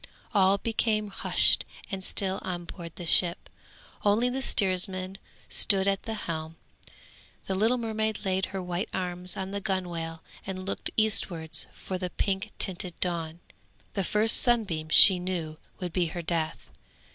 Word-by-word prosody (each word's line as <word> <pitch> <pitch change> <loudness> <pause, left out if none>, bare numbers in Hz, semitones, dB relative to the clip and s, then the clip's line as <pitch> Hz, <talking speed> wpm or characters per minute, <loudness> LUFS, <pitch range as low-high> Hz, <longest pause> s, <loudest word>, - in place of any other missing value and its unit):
All 195 -1 +4
became 215 -1 -1
hushed 195 - +2 0.3
and 190 -1 -4
still 190 0 0
on 175 -2 -5
board 170 -1 -9
the 175 - -7
ship, 175 +1 +3 0.5
only 215 +4 +3
the 265 +2 -3
steersman 190 -3 +1 0.3
stood 195 -1 +3
at 195 -1 +1
the 225 - -5
helm; 160 -5 -5 0.9
the 195 - -2
little 220 +6 +2
mermaid 220 -2 -2
laid 190 0 0
her 190 -1 -5
white 180 +2 -3
arms 180 -1 -2
on 190 0 -4
the 200 0 -4
gunwale 170 -4 -4 0.2
and 185 -1 -6
looked 195 - -4
eastwards 180 -7 +2
for 185 -1 -6
the 180 -1 -3
pink 195 +4 -2
tinted 180 -2 -1
dawn; 170 -2 -2 0.5
the 195 - -1
first 215 +4 +4
sunbeam, 195 -11 +2
she 185 +3 +9
knew, 175 -4 -4 0.2
would 180 -3 -5
be 180 -2 +1
her 170 +1 -6
death. 160 - -3
190 Hz, 150 wpm, -27 LUFS, 175-200 Hz, 0.9 s, she